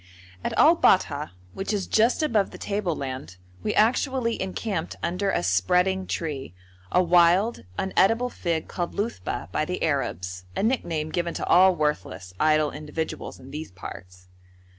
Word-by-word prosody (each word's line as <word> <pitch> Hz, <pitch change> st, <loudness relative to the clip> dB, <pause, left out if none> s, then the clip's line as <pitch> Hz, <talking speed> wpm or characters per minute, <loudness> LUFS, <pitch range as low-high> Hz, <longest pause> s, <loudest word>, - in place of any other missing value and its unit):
At -, -, -2 dB
Al -, -, +7 dB
Bat'ha, -, -, +3 dB, 0.2 s
which 195 Hz, -, -3 dB
is 200 Hz, -3 st, -1 dB
just 230 Hz, +8 st, +2 dB
above 220 Hz, -10 st, +2 dB
the -, -, -10 dB
tableland, 140 Hz, -, -3 dB, 0.2 s
we -, -, -1 dB
actually 240 Hz, +1 st, +2 dB
encamped 190 Hz, -1 st, -3 dB
under 180 Hz, +4 st, 0 dB
a 85 Hz, -, 0 dB
spreading 180 Hz, -, +2 dB
tree, 140 Hz, -, -4 dB, 0.4 s
a 180 Hz, -, +4 dB
wild, 175 Hz, -, +4 dB
unedible 225 Hz, +6 st, +2 dB
fig 165 Hz, -3 st, -2 dB
called 175 Hz, -1 st, -4 dB
luthba 200 Hz, -, -3 dB
by -, -, 0 dB
the -, -, -3 dB
Arabs, 90 Hz, +2 st, -2 dB
a -, -, -1 dB
nickname 170 Hz, -10 st, 0 dB
given 170 Hz, 0 st, -2 dB
to -, -, -3 dB
all 185 Hz, +1 st, +6 dB
worthless, 150 Hz, -, -2 dB
idle 155 Hz, -1 st, +3 dB
individuals 155 Hz, +1 st, -5 dB
in 130 Hz, +1 st, -12 dB
these 155 Hz, +2 st, -6 dB
parts. 90 Hz, -1 st, -11 dB
170 Hz, 145 wpm, -25 LUFS, 140-200 Hz, 0.4 s, Al